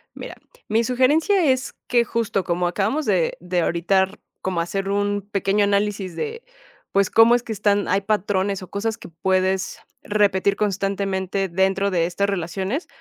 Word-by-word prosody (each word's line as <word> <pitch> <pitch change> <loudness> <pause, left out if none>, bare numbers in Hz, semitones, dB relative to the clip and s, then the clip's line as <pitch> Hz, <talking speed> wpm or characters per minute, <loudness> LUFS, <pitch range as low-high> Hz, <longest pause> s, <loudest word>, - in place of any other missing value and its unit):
Mira, - - -8 0.3
mi 225 +2 +2
sugerencia 300 - +3
es 260 0 -2
que 240 -2 +3
justo 225 -4 -1
como 175 0 0
acabamos 210 - -1
de 185 -6 +1
de 180 0 -1
ahorita 175 +4 +2
r 190 +2 -7 0.2
como 185 -3 -2
hacer 195 +3 -2
un 205 0 0
pequeño 200 +1 +1
análisis 200 -2 0
de 460 +1 -4 0.5
pues 200 -1 +2
cómo 225 +1 +6
es 245 - -1
que 225 - -4
están 205 0 +1
hay 195 +2 +1
patrones 200 -1 0
o 185 - -10
cosas 220 +2 -2
que - - -11
puedes 185 +2 0 0.2
repetir 200 -1 +2
constantemente 195 -1 -1
dentro 190 +2 +1
de 170 -3 +2
estas 200 +3 -1
relaciones, 195 - -3
200 Hz, 160 wpm, -22 LUFS, 190-215 Hz, 0.5 s, cómo